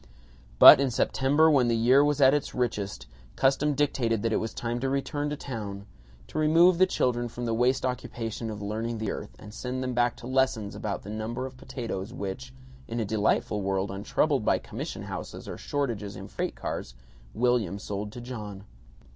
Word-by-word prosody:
But - - +11
in 140 -1 +2
September, 135 +5 +3
when 130 -5 +4
the 115 - +2
year 125 +5 +5
was 145 0 +1
at 135 0 +7
its 145 -1 -1
richest, 105 -5 -2 0.3
custom 140 +2 +2
dictated 120 -7 0
that 115 -1 +1
it - - +3
was 110 - -3
time 120 0 -3
to 135 +2 -1
return 145 +2 -1
to 150 - -2
town; 105 -7 -6 0.4
to - - -5
remove 165 +3 +5
the 185 - +6
children 120 -8 0
from 120 +1 -6
the 115 - 0
waste 125 +4 +2
occupation 115 -3 -4
of 105 -1 -6
learning 110 +3 -3
the 110 -2 -2
earth, 105 - -7
and 105 0 -12
send 130 +2 -4
them 125 0 -2
back 120 0 +2
to - - -12
lessons 130 -5 0
about 105 -2 -4
the 100 - -7
number 110 +4 -4
of 130 0 -8
potatoes 120 -5 -6
which 100 +7 -5 0.4
(in 115 +1 -3
a 110 - 0
delightful 105 0 0
world 95 0 -1
untroubled 115 +7 0
by - - +3
commission - - -6
houses - - -7
or - - -5
shortages 115 -8 -3
in - - -8
freight - - -3
cars) 60 - -5 0.4
William 115 -5 +1
sold 100 +1 -5
to 120 - -8
John. 105 -5 -7
120 Hz, 190 wpm, -27 LUFS, 105-130 Hz, 0.4 s, But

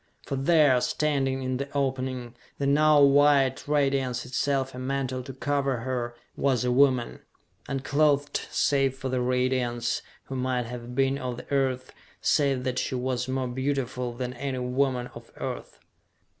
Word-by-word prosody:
For 140 - -3
there, 140 -2 +4
standing 135 -1 0
in 130 0 -1
the 140 +1 -4
opening, 130 -3 -2 0.2
the 140 - -2
now 150 +2 +5
white 140 -1 +4
radiance 135 -4 +1
itself 135 +1 -1
a 125 - -7
mantle 130 -1 -2
to 130 +2 -8
cover 135 -2 -1
her, 120 -1 -3 0.2
was 130 -3 +1
a 125 - +2
woman, 130 -2 +3 0.5
unclothed 145 +1 +1
save 135 -2 +2
for 130 0 -4
the 130 -1 0
radiance, 125 -1 0 0.2
who 135 - -7
might 125 -1 -1
have 120 +1 -7
been 135 +1 +2
of 125 -2 -4
the - - -11
Earth, 130 -2 0 0.3
save 140 -3 +2
that 130 -1 -1
she - - -2
was 125 0 -1
more 130 0 -1
beautiful 130 -1 -2
than 125 +1 -4
any 130 +1 -4
woman 125 0 0
of - - -12
Earth. - - -6
130 Hz, 155 wpm, -27 LUFS, 125-140 Hz, 0.5 s, now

